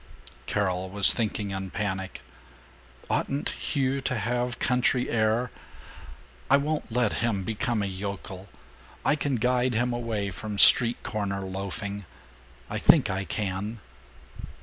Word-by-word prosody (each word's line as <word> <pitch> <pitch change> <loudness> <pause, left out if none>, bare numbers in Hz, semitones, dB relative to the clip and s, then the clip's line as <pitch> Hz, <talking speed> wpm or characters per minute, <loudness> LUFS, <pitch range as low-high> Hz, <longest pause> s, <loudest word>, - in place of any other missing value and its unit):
Carol 95 -2 -1
was 100 +1 +8
thinking, 105 -3 -2
in 95 0 -4
panic, 95 -2 -4 0.9
"Oughtn't 140 +1 -1
Hugh 135 -1 -1
to 130 -1 -2
have 120 +3 -2
country 125 0 +1
air? 115 +2 +1 1.0
I - - +6
won't 150 -3 -2
let 120 -2 0
him 110 -5 0
become 110 +2 -1
a - - -1
yokel. 95 0 -6 0.6
I 150 - +3
can 145 -3 -1
guide 125 +1 +1
him 120 +2 +1
away 110 -4 -3
from 105 +3 -6
street 120 +3 +7
corner 100 -2 -3
loafing.... 100 +1 -5 0.6
I - - -4
think - - +5
I 95 +1 -3
can." 100 +4 -4
110 Hz, 125 wpm, -26 LUFS, 100-125 Hz, 1.0 s, was